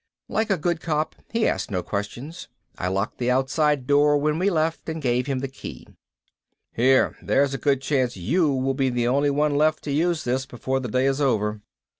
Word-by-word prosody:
Like 220 0 -1
a 195 - +2
good 170 +1 -1
cop 155 -1 -1 0.2
he 230 -1 +1
asked - - -1
no 90 -4 -2
questions. 120 - -5 0.3
I 90 - -3
locked 95 +4 -2
the 125 0 0
outside 135 +2 +1
door 145 +1 +4
when 150 +2 0
we 190 +3 +2
left 160 -2 -1
and 160 0 -3
gave 125 -2 0
him 135 -2 -1
the 135 - -2
key. 135 - -9 0.9
"Here. 130 +3 +3
There's 140 0 +2
a 135 - -3
good 135 -2 +1
chance 130 -5 0
you 145 - +1
will 135 0 0
be 135 -1 +1
the 120 -1 0
only 140 +3 +2
one 145 +1 +1
left 155 +1 +2
to 145 - -4
use 165 +2 +1
this 130 +2 -1
before 130 +2 -2
the 125 -2 -5
day 130 +4 +1
is 135 +1 +1
over." 105 -6 0
135 Hz, 205 wpm, -24 LUFS, 125-155 Hz, 0.9 s, door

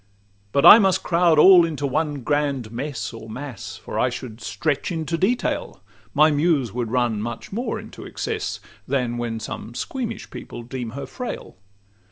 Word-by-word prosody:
But 140 - +3
I 220 - +12
must 190 -3 +2
crowd 170 -2 +3
all 180 +2 +9
into 155 -4 -2
one 145 0 -1
grand 140 -5 0
mess 130 +1 -4
Or 115 -1 -9
mass; 125 -2 -7
for - - -1
should 115 -3 -7
I - - -12
stretch 150 +2 -1
into 165 0 -2
detail, 205 +9 -1 0.4
My 155 +2 +6
Muse 145 - +1
would 120 -2 -2
run 120 -3 0
much 115 +1 -6
more 235 +6 -2
into - - -10
excess, 440 -1 -3 0.3
Than 125 -3 -1
when 115 -1 -3
some 110 +1 -7
squeamish 235 - -4
people 120 - -8
deem 125 -1 -5
her 140 - -4
frail. 245 - -6
145 Hz, 165 wpm, -23 LUFS, 120-170 Hz, 0.4 s, I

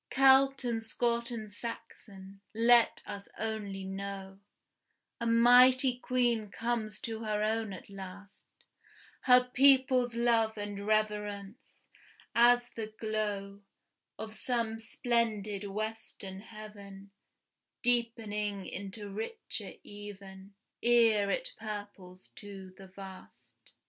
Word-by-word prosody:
Celt 270 0 +5
and 235 -2 -1
Scot 235 +1 -1
and 220 -3 -6
Saxon, 200 -4 -9
let 235 +1 +4
us 200 0 -7
only 210 -3 -4
know, 195 0 -6 0.8
A 235 - -2
mighty 245 +2 +6
Queen 240 -4 +1
comes 225 -1 -2
to 225 -1 -4
her 210 -1 -1
own 220 0 0
at 185 - -9
last, 195 0 -11 0.8
Her 250 -1 +7
people's 255 -1 +4
love 230 -2 +2
and 205 0 -5
reverence 210 +1 -2 0.5
as 240 +1 +5
the 220 -1 -5
glow 205 -2 -3 0.6
Of 220 0 -6
some 230 -1 -2
splendid 220 -3 -1
western 210 -2 -5
heaven, 200 -2 -11 0.7
Deepening 220 -5 0
into 200 +2 -7
richer 220 - -5
even, 200 -1 -11 0.3
Ere 230 -4 +4
it - - -2
purples 205 -4 -8
to 195 -2 -10
the 195 0 -12
vast. 190 0 -13
215 Hz, 105 wpm, -31 LUFS, 200-235 Hz, 0.8 s, Her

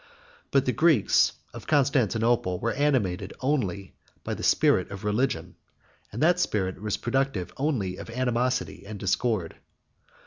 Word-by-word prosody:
But 135 -1 +2
the 125 - +2
Greeks 155 - +3 0.2
of - - -10
Constantinople 120 - +2
were 115 - -1
animated 105 -10 0
only 105 -9 -1 0.3
by - - -3
the - - -6
spirit - - +3
of 100 +1 -8
religion, 105 +6 -1 0.5
and 115 +7 -2
that 175 +2 +4
spirit 95 - -1
was 105 -1 -2
productive 130 -7 -1
only 115 -11 -1
of - - -9
animosity 120 -5 -1
and 105 0 -6
discord. 95 -2 -1
115 Hz, 135 wpm, -26 LUFS, 100-135 Hz, 0.5 s, that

